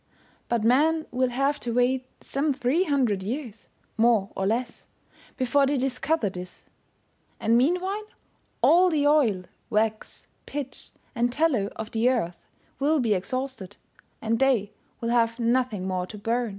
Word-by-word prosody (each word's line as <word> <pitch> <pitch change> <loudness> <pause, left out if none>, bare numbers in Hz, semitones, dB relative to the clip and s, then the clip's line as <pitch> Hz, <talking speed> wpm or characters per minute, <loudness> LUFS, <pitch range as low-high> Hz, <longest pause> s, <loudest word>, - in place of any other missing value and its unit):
But 235 -2 +1
men 310 +7 +3
will 255 0 +1
have 275 +4 0
to 235 - -3
wait 255 +1 +1 0.2
some 280 0 -1
three 280 +8 +1
hundred 255 - +1
years, 230 +1 -5 0.3
more 225 -4 +3
or 190 - -1
less, 240 +3 -2 0.5
before 275 +2 +2
they 285 +1 +1
discover 270 +1 0
this; 180 -1 -8 0.7
and 230 - +2
meanwhile, 365 - +1 0.6
all 360 +2 +6
the 300 -4 +1
oil, 260 -11 +3 0.3
wax, 215 -1 -1 0.2
pitch, 280 -2 -6 0.2
and 240 0 +1
tallow 260 -8 +1
of 220 0 -6
the 230 +2 +2
earth 200 -9 -2 0.3
will 300 +3 +2
be 230 -5 +2
exhausted, 205 0 -4 0.5
and 225 0 0
they 245 -7 +2 0.3
will 230 - -1
have 230 -1 +2
nothing 235 -5 0
more 185 -1 -2
to 210 - -9
burn. 230 +3 -1
245 Hz, 145 wpm, -26 LUFS, 220-275 Hz, 0.7 s, all